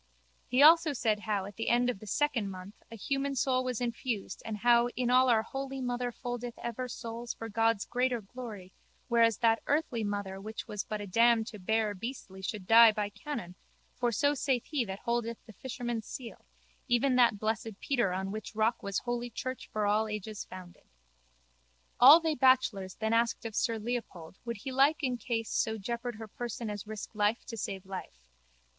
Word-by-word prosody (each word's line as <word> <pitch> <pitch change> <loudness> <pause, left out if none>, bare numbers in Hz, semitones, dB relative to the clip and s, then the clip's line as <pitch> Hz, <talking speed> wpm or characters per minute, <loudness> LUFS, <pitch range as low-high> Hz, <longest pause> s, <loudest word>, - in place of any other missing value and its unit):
He 255 +3 +2
said - - +9
also 300 -8 +5
how 205 -3 -1
at 200 0 -10
the 225 - -1
end 245 +1 +3
of 250 -6 -1
the 215 - -11
second 245 -3 0
month 185 +1 -8 0.2
a - - -7
human 275 +5 -2
soul 255 0 +1
was 255 -3 -2
infused 235 -4 -3
and 220 -1 -4
how 235 +2 +4
in 250 -1 0
all 255 +1 +5
our 220 -2 +4
holy 270 +1 -5
mother 245 -1 -2
foldeth 245 0 -5
ever 235 +2 -4
souls 235 0 -6
for 225 - -7
God's 225 -1 +1
greater 250 0 0
glory 210 -4 -9 0.4
whereas 230 -2 +4
that 230 -2 +3
earthly 285 -6 0
mother 200 -2 -3
which 220 +2 -7
was 210 -1 -3
but 215 -1 -4
a - - -5
dam 230 +3 +4
to 215 -2 -9
bear 220 +2 +1
beastly 200 -2 -7
should 190 0 -4
die 225 +2 +8
by 210 -1 -2
canon 230 - -6 0.4
for 245 -1 0
so 285 +6 +2
saith 265 -3 0
he 295 -5 0
that 190 -1 -6
holdeth 235 -1 -1
the 220 - -13
fisherman's 240 -2 -4
seal, 240 -3 -8 0.4
even 255 +1 +3
that 235 -4 +5
blessed 220 0 -3
Peter 240 -9 +1
on 190 +1 -3
which 215 +1 -6
rock 220 +2 +1
was 200 -1 -2
holy 240 0 -2
church 255 +2 -5
for 215 -1 0
all 210 +2 +2
ages 210 0 -5
founded. 180 -1 -12 1.1
All 275 +7 +10
they 325 -2 0
bachelors 250 -8 +3
then 220 0 -1
asked 230 0 +1
of 225 - -4
sir 230 -1 +1
Leopold 215 -7 -5
would 235 -2 -3
he 260 +7 -6
in - - -6
like 280 +4 +5 0.2
case 225 -3 -2
so 220 -1 0
jeopard 235 +3 -4
her 220 0 -8
person 235 0 -5
as 205 0 -6
risk 215 +1 -7
life 210 +1 +1
to 230 - -6
save 195 -3 -5
life. 125 - -8
230 Hz, 190 wpm, -31 LUFS, 210-245 Hz, 1.1 s, All